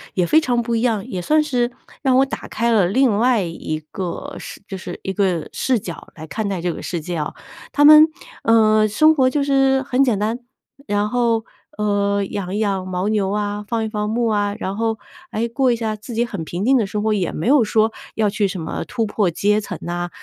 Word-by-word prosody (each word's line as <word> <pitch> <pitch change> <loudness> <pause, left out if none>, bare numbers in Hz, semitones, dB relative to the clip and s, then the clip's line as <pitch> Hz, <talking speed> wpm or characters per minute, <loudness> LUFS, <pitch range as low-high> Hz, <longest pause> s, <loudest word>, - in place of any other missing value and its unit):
也 180 - +2
非 315 - +4
常 245 -5 +1
不 235 0 -1
一 225 - 0
样， 225 -5 0
也 185 - -4
算 310 - +3
是 250 -5 0 0.3
让 260 -3 +3
我 270 - +5
打 270 - -6
开 235 +1 0
了 205 -6 +4
另 230 +2 +2
外 240 0 +3
一 165 -2 -4
个 185 -3 -5
视 - - -9
就 195 - -6
是 180 -1 -7
一 190 - -3
个 185 -4 0
视 255 -3 +1
角， 175 -4 -8
来 160 - -8
看 215 +4 -3
待 195 -2 -2
这 175 0 -1
个 - - -8
世 175 - -3
界 175 +3 -5
啊。 150 -1 -3 0.4
他 290 - +4
们， 305 +1 +9 0.4
呃， 215 -1 +4
生 310 +10 +4
活 260 -3 +4
就 290 +2 0
是 270 -1 +3
很 265 0 +2
简 245 -6 +2
单， 220 +4 -1 0.5
然 205 0 +1
后， 235 -2 +1 0.3
呃， 200 -1 +1
养 195 0 -4
养 200 -3 -1
牦 185 +1 -2
牛 205 -3 +1
啊， 205 0 -2
放 230 0 -1
一 - - -2
放 210 -1 -2
牧 235 +2 0
啊， 205 -2 0
然 190 -2 -3
后， 225 +1 -1 0.3
哎， 225 +2 -1
过 255 +2 +1
一 - - +2
下 220 -2 -2
自 215 +3 -10
己 235 +2 +1
很 200 -8 -5
平 175 +5 -4
静 265 +2 +5
的 225 - +1
生 210 +1 -3
活， 220 0 +2
也 190 -5 -1
没 160 - -3
有 275 -1 +5
说 220 +1 +2 0.2
要 215 -2 +2
去 205 0 0
什 185 -1 -5
么 160 - -4
突 225 - -1
破 205 -2 0
阶 210 +5 +1
层 185 -4 -6
呐， 175 0 -3
215 Hz, 245 characters per minute, -20 LUFS, 195-240 Hz, 0.5 s, 们